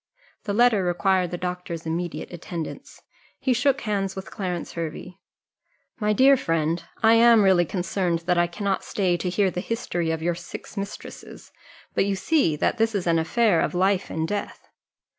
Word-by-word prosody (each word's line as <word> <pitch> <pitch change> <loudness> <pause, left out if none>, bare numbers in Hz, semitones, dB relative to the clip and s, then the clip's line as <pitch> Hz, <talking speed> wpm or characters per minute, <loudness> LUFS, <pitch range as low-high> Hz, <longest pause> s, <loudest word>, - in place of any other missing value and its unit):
The 205 - -1
letter 230 -3 +4
required 180 +1 +1
the 175 - -4
doctor's 180 -2 -5
immediate 170 +2 -4
attendance. 175 - -7 0.3
He 260 - +1
shook 275 +3 +1
hands 195 -3 -2
with 190 +2 -8
Clarence 180 -4 -4
Hervey: 170 +2 -6 0.8
"My 210 -1 +1
dear 265 +6 +6
friend, 165 - -1 0.2
I 225 +1 +7
am 230 -1 +6
really 185 -3 +4
concerned 175 -2 -1
that 180 0 +2
I 175 0 +3
cannot 195 +2 -2
stay 185 -4 0
to 180 - -2
hear 190 +1 +1
the 180 - -3
history 180 -7 -2
of 160 0 -2
your 175 +1 +1
six 175 +4 -9
mistresses; 200 -1 -8 0.4
but - - +2
you 200 -1 0
see 195 - +2
that 220 - 0
this 225 -1 +1
is 190 - -1
an 165 -1 +3
affair 175 +2 +2
of - - -1
life 190 +1 +1
and 160 0 -2
death." 205 +3 -5
185 Hz, 175 wpm, -24 LUFS, 175-210 Hz, 0.8 s, I